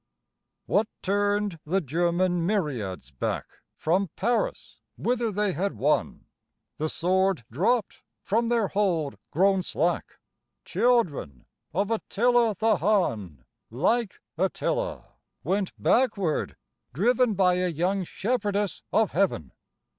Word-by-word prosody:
WHAT 210 +2 +2 0.2
turned 205 -2 0
the 185 +6 +1
German 175 +3 +1
myriads 130 - -2
back 65 - -2 0.3
From 180 +4 +1
Paris 235 +4 -1 0.2
whither 235 -2 0
they 205 0 0
had 195 +6 -2
won? 150 +3 0 0.5
The 155 +1 -1
sword 185 -4 +1
dropped 205 - 0 0.2
from 230 +3 +1
their 230 -4 +1
hold 175 -8 0
grown 190 +3 +3
slack; 175 0 -1 0.5
Children 170 - +1 0.3
of 200 +4 -1
Attila 230 0 +2
the 220 -2 +3
Hun, 110 - 0 0.2
Like 190 - 0 0.2
Attila, 345 - -1 0.4
went 195 0 0
backward 200 - +1 0.4
driven 235 - +2
By 180 -1 +3
a 180 - +1
young 180 +4 0
shepherdess 205 0 -1
of 220 -2 +2
Heaven. 170 - 0
195 Hz, 110 wpm, -26 LUFS, 165-215 Hz, 0.5 s, grown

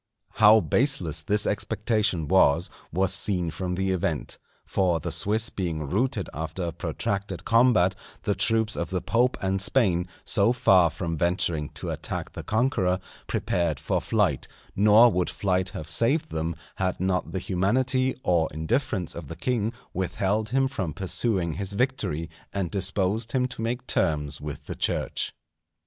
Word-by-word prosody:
How 110 0 +6
baseless 85 - +2
this 105 +6 +2
expectation 105 -5 0
was, 85 -2 +3 0.2
was 95 +2 +2
seen 90 -5 +2
from 90 +1 -3
the 95 +1 0
event. 85 -5 -2 0.3
For 90 -4 +1
the - - -4
Swiss 110 +3 +1
being 85 -5 -3
routed 110 - 0
after 80 +4 -4
a 85 - -2
protracted 95 +2 -4
combat, 115 -6 +4 0.3
the 105 - +1
troops 110 +2 +2
of 85 -2 -3
the 90 -1 -2
Pope 125 +2 +1
and 95 0 0
Spain, 95 -6 +2 0.2
so 100 +4 +3
far 95 -8 +5
from 85 +1 -4
venturing 85 -3 0
to - - -5
attack - - -5
the - - -7
conqueror, 105 -6 +1 0.3
prepared 85 -5 -1
for - - -1
flight; 100 - 0 0.3
nor 105 +4 +6
would 90 -2 0
flight 95 -1 -1
have 80 - -7
saved 130 - +1
them, 80 +1 -2 0.2
had 95 -1 -1
not 95 0 -1
the - - -3
humanity 125 +9 +1
or 85 -3 +2
indifference 95 - -1
of 85 -4 -8
the 80 - -7
king 115 +4 -1 0.2
withheld 100 +3 -1
him 135 +1 +2
from 95 - -4
pursuing 95 -3 +1
his 100 +4 -3
victory, 100 - -1 0.2
and 95 -4 -3
disposed 100 +4 -1
him 125 -1 +2
to 125 - -6
make 120 +2 -2
terms 75 - 0
with 75 -1 -7
the - - -5
Church. - - -2
95 Hz, 155 wpm, -26 LUFS, 85-110 Hz, 0.3 s, How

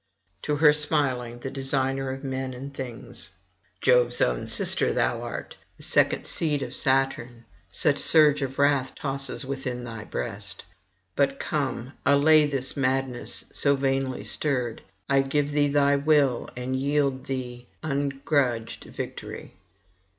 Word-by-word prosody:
To 150 - -1
her 150 0 +6
smilingly 140 -6 0
the 130 +2 -6
designer 135 0 -1
of 135 +1 -5
men 130 -1 -3
and 140 +3 -8
things: 130 -4 -7 0.5
'Jove's 120 -1 +4
own - - +1
sister - - +2
thou - - +1
art, - - -6 0.2
and - - -8
second - - +3
seed 150 -4 0
of - - -6
Saturn, 130 -3 0 0.2
such - - +1
surge 150 -2 +5
of 135 0 -3
wrath 140 -2 +2
tosses 135 0 -3
within 130 -2 -4
thy 115 -3 -7
breast! 100 -1 -5 0.5
But 140 -1 +1
come, 135 -3 -2
allay 150 +2 +6
this 135 -3 -3
madness 130 -2 -1
so 140 0 +2
vainly 135 -1 -1
stirred. 125 -6 -1 0.3
I 135 0 +4
give 145 +2 0
thee 145 0 +3
thy 140 0 +3
will, 140 -4 +2
and 125 +1 -2
yield 140 0 0
thee 125 -2 -5 0.2
ungrudged 140 -4 -1
victory. - - -7
135 Hz, 135 wpm, -26 LUFS, 125-140 Hz, 0.5 s, her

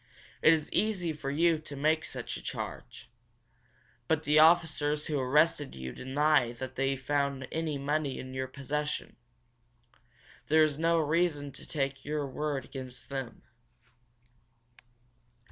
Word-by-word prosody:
"It 155 - +7
is 160 -2 +1
easy 190 -6 +1
for 145 -2 -5
you 160 +3 +3
to 150 -2 -8
make 155 +3 +2
such - - -5
a - - -7
charge. - - -7 1.0
But 160 -1 +1
the 150 +1 +4
officers 155 -2 +4
who 150 -3 -1
arrested 145 +3 +2
you 65 -1 -6
deny 135 - +2
that 130 +2 -6
they 135 0 0
found 140 0 -1
any 160 -2 -2
money 145 0 -1
in 130 0 -7
your 130 0 -2
possession. 145 +3 -3 1.3
There 155 +1 +5
is 150 -1 0
no 165 +1 +3
reason 155 -2 +1
to - - -11
take 135 -2 -2
your 150 0 -2
word 140 +1 -3
against 130 -2 -8
them." 135 -4 -5
145 Hz, 135 wpm, -30 LUFS, 135-155 Hz, 1.3 s, It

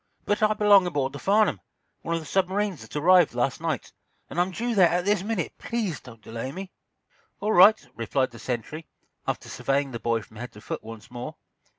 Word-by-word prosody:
"But 205 - 0
I 215 0 +3
belong 205 -3 +6
aboard 140 -5 -1
the 145 - -7
'Farnum,' 210 0 +2 0.4
one 170 - -2
of 165 - -2
the - - -10
submarines 190 +2 0
that - - -12
arrived 175 -2 +5
last 125 +4 0
night. 160 -6 -3 0.4
And 175 - +1
I'm 180 - +1
due 235 +6 -2
there 185 -5 +6
at 175 +1 0
this 205 -2 +2
minute. 200 -5 -2
Please 210 - -2
don't 115 -4 -14
delay 115 +4 -5
me." 190 +4 -7 0.7
"All 210 +2 0
right," 205 +5 +7
replied 130 +3 0
the 115 - -12
sentry, 130 +7 -4 0.4
after - - -2
surveying 140 0 -1
the 115 - -5
boy 115 0 0
from 110 - -16
head 120 +2 -7
to 105 - -13
foot - - -5
once 110 0 -10
more. 120 0 -6
165 Hz, 205 wpm, -26 LUFS, 125-195 Hz, 0.7 s, right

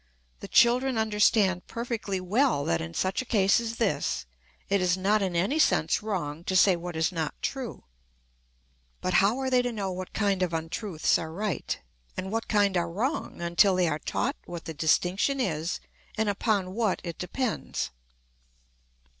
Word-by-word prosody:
The - - -8
children 250 +1 +4
understand 210 -3 +2
perfectly 230 -5 -3
well 200 - +1
that 85 - +1
in 80 +1 -6
such 190 +5 0
a - - -5
case 200 -3 +3
as 230 -1 -4
this 210 - -1 0.4
it 200 -1 +2
is 180 0 +2
not 205 +3 +2
in 185 -3 -1
any 200 - +1
sense - - +3
wrong 170 -7 -3
to 190 - -1
say 185 0 +6
what 175 0 -6
is 160 +3 +1
not 160 -4 -3
true. 260 -4 -4 1.2
But 185 - -2
how 205 +5 +2
are 265 -1 -2
they 250 -1 +5
to 245 0 -2
know 200 -4 -3
what 185 0 -6
kind 200 -3 0
of 180 -2 0
untruths 165 +1 0
are 160 -1 -5
right, 195 -1 -3 0.4
and 190 +1 -4
what 225 +1 -2
kind 205 -3 +2
are 170 -1 0
wrong, 225 - -3
until 175 +3 +4
they 180 -1 +2
are 155 -1 -1
taught 275 - -2
what 170 -2 -7
the 160 - -5
distinction 180 - +1
is 165 -8 -1 0.4
and 220 -1 +1
upon 200 -2 0
what 215 -3 0
it 170 -3 -6
depends. 220 - -2
195 Hz, 170 wpm, -27 LUFS, 175-225 Hz, 1.2 s, say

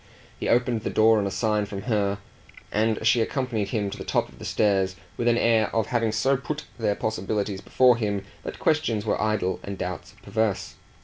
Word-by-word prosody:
He - - -2
opened 120 -1 +2
the - - -2
door 110 0 +5
on 100 - 0
a - - -1
sign 105 0 0
from 100 -1 -6
her, 100 -4 0 0.5
and 110 +1 +1
she 115 +1 +5
accompanied 115 -3 -1
him 100 -1 -1
to - - -7
the - - -4
top - - 0
of - - -17
the - - -8
stairs 95 -3 +1 0.2
with 120 - -1
an 120 0 +4
air 115 -3 +3
of 115 - +2
having 115 -2 +2
so 120 +6 +2
put 150 +3 -5 0.2
their 105 -3 +1
possibilities 100 -1 -2
before 125 -2 +4
him 105 -3 -2 0.2
that - - -6
questions 115 -9 +1
were 110 - 0
idle 105 -4 0
and 100 -1 -6
doubts 90 0 -5
perverse. 110 -3 -1
110 Hz, 200 wpm, -25 LUFS, 100-115 Hz, 0.5 s, door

